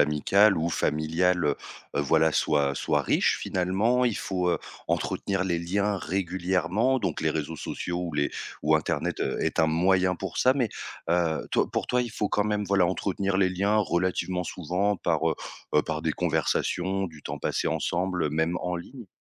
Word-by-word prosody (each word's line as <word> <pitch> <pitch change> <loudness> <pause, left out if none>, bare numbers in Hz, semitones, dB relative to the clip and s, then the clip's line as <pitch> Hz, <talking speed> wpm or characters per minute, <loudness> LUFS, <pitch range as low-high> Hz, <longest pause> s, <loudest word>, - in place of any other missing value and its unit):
amicale 95 +8 +4
ou 85 +2 0
familiale, 80 +4 +1 0.5
heu, - - +2
voilà 80 +2 +3
soit 70 -2 +2
soit - - +1
riche - - +2
finalement, 100 +8 +1
il 120 -4 +1
faut 90 -2 -1
heu - - +1 0.3
entretenir 95 -1 -1
les 85 -3 0
liens 100 +4 0
régulièrement, 95 +6 0
donc - - -2
les 80 0 +1
réseaux 80 +1 -3
sociaux 85 +3 -4
ou 80 - -5
les 75 -1 0 0.3
ou 80 +1 +4
internet, 80 - -1
heu, - - -1
est - - 0
un 80 - +4
moyen 90 +2 +2
pour 95 -2 -6
ça. 130 - +4
Mais 125 -5 0 0.4
heu 85 -2 +1
toi, - - +2
pour - - -2
toi, 125 0 +1
il 120 - -5
faut 105 -2 -2
quand 105 - +1
même, 105 -1 0
voilà, 95 -2 +3
entretenir 95 +1 -1
les 95 -1 +3
liens 100 +4 +1
relativement 90 -1 0
souvent 90 +4 -1
par - - +1
heu, - - -1 0.4
heu, 75 - +5
par 80 -1 -3
des 80 - 0
conversations, 90 +3 0
du 80 -3 -12
temps - - -5
passé - - -1
ensemble, 85 0 -1
même 80 +3 0
en 90 0 -2
ligne? 115 +6 -8
90 Hz, 180 wpm, -27 LUFS, 80-100 Hz, 0.5 s, heu